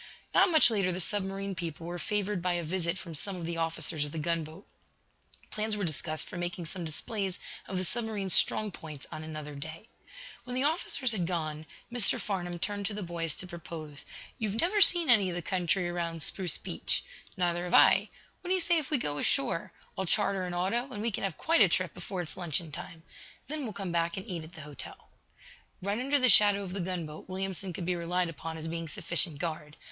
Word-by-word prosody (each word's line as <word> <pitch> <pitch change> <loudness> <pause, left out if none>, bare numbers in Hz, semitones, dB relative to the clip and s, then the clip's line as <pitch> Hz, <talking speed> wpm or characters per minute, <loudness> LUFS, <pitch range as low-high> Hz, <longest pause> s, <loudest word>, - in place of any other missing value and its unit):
Not - - +6
much 315 -7 +7
later 195 -4 +1
the 180 - -3
submarine 195 +1 -1
people 165 -2 -5
were 175 +1 -5
favored 205 -2 -1
by 180 0 +1
a 175 -1 -1
visit 170 +1 -1
from 170 -2 -8
some 190 +6 -3
of 175 -2 -5
the 170 0 -3
officers 165 -1 0
of 145 - -5
the 165 - -6
gunboat. 165 +2 -3 0.9
Plans 215 0 -1
were 205 - -2
discussed 155 -1 -1
for - - -7
making 175 0 -3
some 175 +3 -5
displays 190 +4 -3 0.3
of 190 - -3
the 185 - 0
submarine's 210 -3 -1
strong 215 -1 +5
points 155 -5 -9
on 155 - -6
another 155 -1 -6
day. 155 +9 -8 0.5
When 250 +1 -6
the 260 - +1
officers 285 -4 +2
had 185 -6 0
gone, 155 -3 -3 0.3
Mr. 245 -4 +6
Farnum 175 -4 -3
turned 200 +2 -2
to 210 - -4
the 210 - -3
boys 170 -3 0
to - - -6
propose: 165 -4 -7 0.4
"You've 220 -1 -2
never 405 +5 +2
seen 345 -4 +7
any 210 -6 +6
of 175 - -4
the 175 - -4
country 180 0 0
around 170 -2 -3
Spruce 180 -1 -1
Beach. - - -2 0.3
Neither 175 -1 0
have 175 - +1
I. - - +6 0.3
What - - -9
do 375 - +4
you - - +2
say 345 -1 +3
if 295 - -5
we 300 - +4
go 145 - -1
ashore? 135 +4 +1 0.2
I'll 190 - -2
charter 195 -1 +2
an 175 - -4
auto, 235 +9 0
and 210 -3 -4
we 230 - +1
can - - -3
have 190 -5 -2
quite 330 -3 +3
a 195 - +8
trip 185 0 0
before 180 0 -4
it's 160 - -6
luncheon 170 -2 -2
time. 160 +2 -7 0.4
Then 300 -1 -3
we'll 220 - -4
come 195 -2 -4
back 170 0 0
and 190 - -5
eat 175 -5 -4
at 160 +2 -12
the 160 - -9
hotel." 145 -2 -9 0.7
Right 200 +4 -1
under 275 +3 +3
the 255 -2 +5
shadow 205 -2 +7
of 185 -2 -6
the 195 - -2
gunboat, 170 -3 -5
Williamson 190 0 -3
could 170 +1 -5
be 180 0 +1
relied 175 +1 0
upon 160 +1 -6
as 160 0 -3
being 165 0 -4
sufficient 160 0 +2
guard. 155 -1 -5
180 Hz, 215 wpm, -30 LUFS, 165-205 Hz, 0.9 s, a